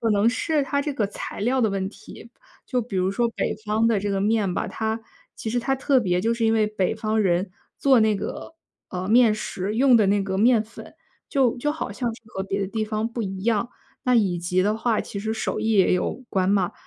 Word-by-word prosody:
可 230 - 0
能 205 +1 +3
是 305 +3 0
它 280 +1 -1
这 290 0 -3
个 215 -6 0
材 200 - -7
料 255 +5 +1
的 225 - +3
问 195 -1 -2
题， 230 - -13 0.3
就 250 -2 -1
比 220 -4 -5
如 185 +1 +1
说 235 +4 +1
北 - - -2
方 220 +2 +2
的 225 -3 +2
这 205 - -2
个 195 - 0
面 210 -3 +1
吧， - - -1
它 220 0 -2 0.4
其 220 - -4
实 245 +2 0
它 270 +3 0
特 270 0 +2
别 180 -4 0
就 230 - +2
是 235 0 -3
因 225 - +3
为 215 -1 +3
北 210 -2 -1
方 220 0 0
人 185 0 +1 0.3
做 265 -4 +5
那 215 -1 +3
个， 260 - -6 0.3
呃， 180 0 -4
面 225 0 +5
食 200 -1 -4
用 260 +1 +5
的 215 -4 +5
那 200 +1 +2
个 190 -1 -2
面 225 0 +4
粉， 225 - -13 0.3
就 255 -3 +2
就 295 +4 0
好 300 -9 -4
像 240 +2 -2
是 - - -17
和 190 -2 -4
别 195 +1 -3
的 - - -1
地 220 +3 -3
方 215 +1 -1
不 235 0 -5
一 190 -2 -5
样。 230 +1 +1 0.4
那 250 -1 +3
以 195 -6 +2
及 180 +2 0
的 210 +2 +1
话 225 0 +1
其 200 - -6
实 220 +1 -2
手 220 - -2
艺 220 +1 +1
也 195 -4 +4
有 240 +7 -1
关 190 -1 +1
嘛， 195 -3 +2
220 Hz, 260 characters per minute, -24 LUFS, 195-235 Hz, 0.4 s, 做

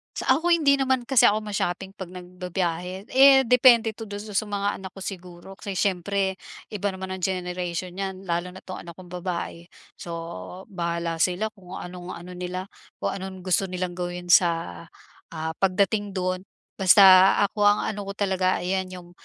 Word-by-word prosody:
Sa 260 +2 +2
ako 340 - -2
hindi 300 -5 +4
naman 260 -2 +1
kasi 255 0 +5
ako 215 +1 +1
ma-shopping 195 -2 -3
'pag 195 -2 -8
nagbibiyahe. 180 0 -4
Eh, 270 0 +7
depende 240 -2 +5
'to 220 +1 -9
dun 205 0 -6
sa 215 - -9 0.2
mga 205 0 -2
anak 190 -1 -9
ko 195 - -8
siguro 180 0 -9
kasi 200 -2 -5
siyempre 190 0 0 0.3
iba 205 -1 -2
naman 190 -1 -5
ang 190 - -4
generation 180 -1 -3
nyan 190 0 -5
lalo 175 -1 -2
na't 180 +1 -11
'tong 185 - -7
anak 170 -1 -10
kong 180 -1 -13
babae. 175 -1 -5 0.3
So, - - -8 0.6
bahala 170 -2 -2
sila 185 +6 +1
kung 190 -4 -12
anong, 180 0 -7
ano 175 +2 -10
nila 180 +1 -5 0.3
kung - - -2
anong 190 -1 -7
gusto 190 +1 +1
nilang 180 -1 -3
gawin 175 0 -4
sa, 165 - +3 0.5
ah, 160 0 -3
pagdating 200 +1 +1
dun. 185 +1 -2 0.3
Basta 190 0 +8 0.2
ako 205 -1 +2
ang 205 0 +3
ano 205 -2 -4
ko 200 - -5
talaga 185 -3 0
ayan 185 +1 -1
yung, 180 -1 -11
185 Hz, 170 wpm, -25 LUFS, 180-200 Hz, 0.6 s, Basta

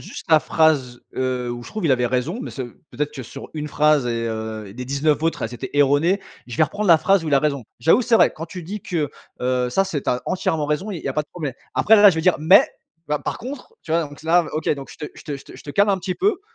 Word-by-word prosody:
juste - - -9
la 155 -1 +7
phrase, 140 -7 +1
heu, 130 -1 -1
où 120 0 -7
je - - -10
trouve 215 -4 -5
il 140 - +4
avait 125 -1 +2
raison. 130 - -1
Mais - - -6
ça 130 - -5
veut 120 - -14
peut-être 150 +1 -3
que 130 - -6
sur 135 +4 -10
une 150 -1 -4
phrase 150 -3 +3
et 115 -1 -1
heu 110 -1 -4
et - - -11
les 125 +4 -6
19 145 +3 +1
autres, 165 0 0
elles 115 +2 -3
étaient 130 +2 -6
erronées. 145 +7 +3 0.3
Je 120 - -7
vais 155 - +5
reprendre 205 +6 -3
la 165 -2 +8
phrase 195 +2 +3
où - - -3
il 145 - +3
a - - +6
raison: 140 -3 -1 0.2
«J'avoue, 165 - +4
c'est 230 -1 +4
vrai, - - +4
quand 165 +2 -6
tu 180 0 -8
dis 205 +6 -6
que, 155 -6 -2 0.3
heu, 125 0 +1
ça 195 +9 +2
c'est 145 -7 -3
tu - - 0
as 125 - -1
entièrement 160 -4 0
raison 150 +8 -1
et 185 - -4
il - - -12
y - - -1
a 135 - -1
pas 150 - 0
de 150 - -23
problème». 155 -6 -5 0.2
Après, 220 - +5
là 205 0 +9
je - - -3
vais 160 - +1
dire: 180 +1 +4
«Mais, 160 +6 +6 0.4
bah, 150 0 0
par - - -4
contre, 275 - -8
tu 160 - -5
vois». 170 - +3
Donc 145 - -12
s - - -15
là, 170 +1 +4
heu, - - -7
OK, 155 - -2
donc 140 -1 -9
je - - -12
te - - -12
je - - -13
te 145 - -4
je 140 - -14
te - - -13
je - - -13
te 145 - -7
calme 200 +6 +3
un 190 - +1
petit 185 0 -3
peu, 395 0 +1
150 Hz, 310 wpm, -22 LUFS, 130-175 Hz, 0.4 s, là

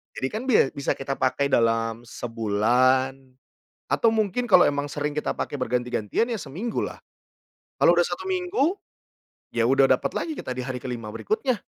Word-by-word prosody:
Jadi 130 - -2
kan 220 - -4
bia 210 - +4
bisa 140 - -2
kita 135 0 -4
pakai 140 +2 +1
dalam 115 0 +1
sebulan 120 +4 +1 0.7
atau 225 -1 +3
mungkin 220 +2 0
kalau 185 -7 +6
emang 145 0 -1
sering 145 +1 -3
kita 150 - -1
pakai - - -4
berganti-gantian 125 - -1
ya 235 - -1
seminggu 190 - -3
lah. - - -7 0.8
Kalau - - +5
udah - - +3
1 380 - -5
minggu, 360 -3 0 0.8
ya - - +2
udah - - +4
dapat - - +2
lagi 315 -2 -3
kita - - -6
di 125 - -4
hari 125 -2 -5
ke-5 120 -4 -5
berikutnya. 260 - -2
135 Hz, 165 wpm, -25 LUFS, -, 0.8 s, kalau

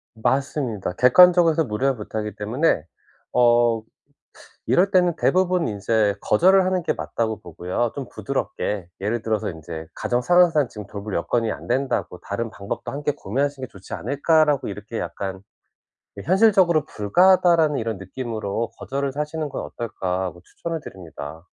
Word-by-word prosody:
맞습니다. 130 -4 -1
객관적으로 175 +6 +7
해서 160 +1 +1
무리한 130 +2 0
부탁이기 105 0 -5
때문에 110 - 0 0.5
어 120 -2 +4 0.9
이럴 190 +3 +3
때는 180 -3 +3
대부분 180 -2 +2
인제 105 0 +1
거절을 190 +2 +4
하는 185 -1 +1
게 - - 0
맞다고 110 -2 -3
보고요 90 +7 -3
좀 135 -3 -6
부드럽게. 100 -5 -3
예를 110 +3 -1
들어서 110 -3 -1
인제 80 -1 -7
"가정 120 0 -1
상황상 170 -5 +4
지금 105 -2 -9
돌볼 100 0 -7
여건이 115 +6 0
안 - - -7
된다."고 130 -7 -1
"다른 115 +3 -3
방법도 100 -1 -6
함께 145 +1 -1
고민하시는 135 +1 -3
게 - - -30
좋지 95 -1 -11
않을까."라고 145 +1 +2
이렇게 105 +3 -7
약간 95 +3 -5 0.8
이 - - -5
'현실적으로 185 -5 +4
불가하다.'라는 165 - +3
'이런 115 -4 -2
느낌으로 110 +1 -4
거절을 140 0 -2
하시는 150 +1 -3
건 - - -5
어떨까.' 95 -5 -3
하고 90 -1 -6
추천을 165 - -6
드립니다. 80 - -9
120 Hz, 370 characters per minute, -23 LUFS, 105-155 Hz, 0.9 s, 객관적으로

